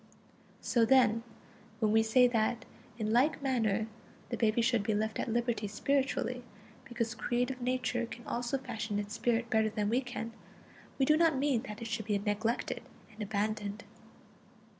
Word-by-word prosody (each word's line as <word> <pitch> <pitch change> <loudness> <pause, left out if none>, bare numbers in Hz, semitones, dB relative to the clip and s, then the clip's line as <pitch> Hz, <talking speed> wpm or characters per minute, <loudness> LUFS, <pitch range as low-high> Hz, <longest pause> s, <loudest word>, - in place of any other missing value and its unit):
So 235 - +2
then, 230 -2 +5 0.6
when 215 -2 +2
we 220 +1 +5
say 245 +3 +5
that 235 0 0 0.3
in 215 -1 -1
like 260 +6 +3
manner 225 -6 +1 0.4
the 240 - -1
baby 230 0 +2
should 235 -2 +3
be 215 +1 0
left 220 +1 -1
at - - -1
liberty 235 -2 0
spiritually, 255 +2 0 0.4
because 235 -3 -2
creative 245 +3 -1
Nature 245 -1 0
can 235 +1 -10
also 240 +3 -1
fashion 225 -5 -4
its 205 0 -3
spirit 235 0 0
better 220 -1 +3
than 210 -1 -1
we 245 +4 +2
can, 245 -2 -5 0.6
we 270 - +3
do 305 - +5
not 325 -3 +4
mean 270 -4 +2
that 210 +2 -7
it - - -4
should 220 -1 -3
be 205 -2 +2
neglected 210 +3 -1 0.3
and 215 0 -11
abandoned. 210 0 -2
230 Hz, 160 wpm, -32 LUFS, 215-245 Hz, 0.6 s, then